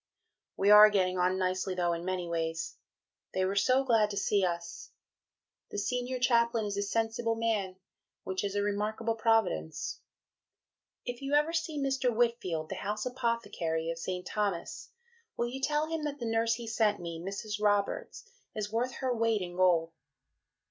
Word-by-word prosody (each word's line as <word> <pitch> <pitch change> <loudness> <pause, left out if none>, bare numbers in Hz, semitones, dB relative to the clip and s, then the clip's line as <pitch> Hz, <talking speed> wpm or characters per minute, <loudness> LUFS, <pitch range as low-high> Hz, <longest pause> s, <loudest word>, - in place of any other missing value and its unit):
We 200 +1 +4
are 210 0 +10
getting 185 -3 +1
on 180 +1 +2
nicely 185 0 -1
though 175 -1 +1
in 170 0 -4
many 185 -1 -2
ways. 165 -1 -2 0.6
They 185 0 +2
were 195 +1 -1
so 255 +6 +3
glad 225 -5 +3
to 200 - -5
see 200 0 +2
us. 170 -1 -3 0.8
The - - -6
Senior 250 +4 -1
Chaplain 235 -2 +2
is 205 -1 -3
a 200 - -1
sensible 225 +2 0
man, 215 -5 -1 0.5
which 190 +1 -3
is 200 0 -2
a 205 - +1
remarkable 210 +2 -1
Providence.... 220 - 0 1.1
If 245 +1 -5
you 275 +1 0
ever 300 +3 +3
see 325 -2 -2
Mr. 270 -2 +1
Whitfield, 220 -9 0
the 190 - -4
House 210 +3 -3
Apothecary 230 -10 -1
of 165 - -6
St. 180 +1 -4
Thomas', 200 -5 -3 0.5
will 240 - 0
you 265 +2 -6
tell 300 +2 +1
him 320 -1 -3
that 290 -1 -3
the 240 - -5
nurse 225 0 +1
he 235 0 -7
sent 220 -2 +1
me, 170 -1 -6
Mrs. 205 +3 -5
Roberts, 205 - 0 0.3
is 210 -1 -3
worth 245 +3 -1
her 260 -1 +1
weight 225 -3 +1
in 175 0 -7
gold.... 175 -3 +3
210 Hz, 170 wpm, -30 LUFS, 185-235 Hz, 1.1 s, are